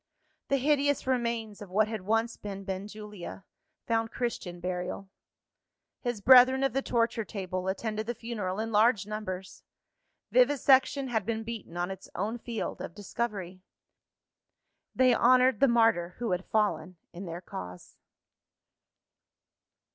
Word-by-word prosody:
The 275 - +2
hideous 285 +1 +2
remains 235 -5 -1
of 205 - -8
what 210 +3 +2
had 220 -2 -4
once 225 +4 0
been 195 -1 -7
Benjulia, 200 0 -7 0.4
found 225 -1 0
Christian 215 -8 -4
burial. 180 +2 -4 0.9
His 240 -4 -3
brethren 260 +3 +7
of 270 -3 +1
the 270 - +1
torture 230 -2 0
table, 185 -2 -4
attended 215 +2 -2
the 240 - -2
funeral 210 -5 -4
in 225 +1 -2
large 215 -1 +4
numbers. 190 -3 -6 0.7
Vivisection 275 - +4
had 220 -4 0
been 225 +2 -2
beaten 220 -7 -7
on 175 +2 -1
its 190 0 -9
own 215 +6 -2
field 230 -2 -4
of 170 - -7
discovery. 200 -3 -4 1.3
They 255 -1 +5
honoured 255 -1 +4
the 275 - +6
martyr 225 -8 +3
who 235 -4 -2
had 180 +1 -1
fallen 185 -5 0 0.2
in 180 +3 -7
their 170 +1 -5
cause. 90 - -9
215 Hz, 130 wpm, -29 LUFS, 190-240 Hz, 1.3 s, brethren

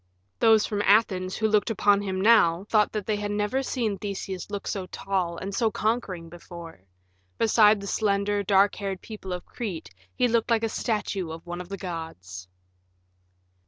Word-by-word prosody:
Those 220 -2 +5
from 205 -1 -2
Athens 195 -3 +3
who 220 - +1
looked 210 0 +2
upon 205 -2 +3
him 190 -2 -3
now 190 -5 +5
thought 210 0 +2
that 210 -3 -3
they 215 -1 0
had 205 0 -3
never 210 +6 0
seen 230 -7 -2
Theseus 195 -2 -5
look 205 -1 -5
so 190 -2 -3
tall 185 -3 -2
and 195 +3 -5
so 225 +2 +2
conquering 210 -6 -2
before; 170 - -11 0.6
beside 215 -2 +5
the 200 - -7
slender, 200 0 0
dark 200 0 +4
haired 195 -2 -4
people 210 -4 -8
of 180 -1 -4
Crete 200 -9 -6 0.2
he 250 - +3
looked 230 0 +1
like 230 -1 +2
a 225 - +1
statue 210 -6 -2
of 165 +1 -8
one 175 0 -5
of 180 - -11
the 195 - -5
gods. 160 - -7
200 Hz, 175 wpm, -26 LUFS, 185-215 Hz, 0.6 s, Those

